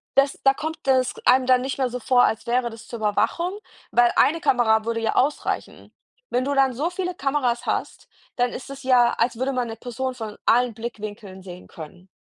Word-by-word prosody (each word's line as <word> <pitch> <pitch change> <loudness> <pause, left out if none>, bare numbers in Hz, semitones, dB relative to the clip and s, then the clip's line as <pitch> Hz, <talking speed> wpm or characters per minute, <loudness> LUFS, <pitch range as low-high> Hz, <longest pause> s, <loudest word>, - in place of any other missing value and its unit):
das 275 0 +3
da 270 - +5
kommt 315 +1 -6
es 255 -1 +3
einem 255 +1 +5
dann 255 -1 +5
nicht 265 +1 -3
mehr 260 -2 0
so 250 +1 -5
vor, 245 +1 +3
als 220 - 0
wäre 240 0 0
das 225 0 -12
zur 235 - -7
Überwachung, 340 - 0 0.3
weil 240 0 +4
1 - - +6
eine 325 +4 -2
Kamera 220 -3 +3
würde 230 0 -1
ja 220 -1 -1
ausreichen. 290 +3 -1 0.4
Wenn 250 +1 0
du 285 - 0
dann 270 -2 +3
so 295 +8 -1
viele 360 0 -4
Kameras 265 -5 -1
hast, - - -3 0.3
dann 245 0 +1
ist 265 - -8
es 275 0 -9
ja, 245 -2 +4
als 235 0 0
würde 265 +2 -1
man 250 -2 -1
’ne 225 - -6
Person 255 +3 -4
von 220 -3 -7
allen 245 -1 +3
Blickwinkeln 210 -4 -7
sehen 180 -1 -11
können. 180 +4 -12
250 Hz, 210 wpm, -23 LUFS, 225-270 Hz, 0.4 s, 1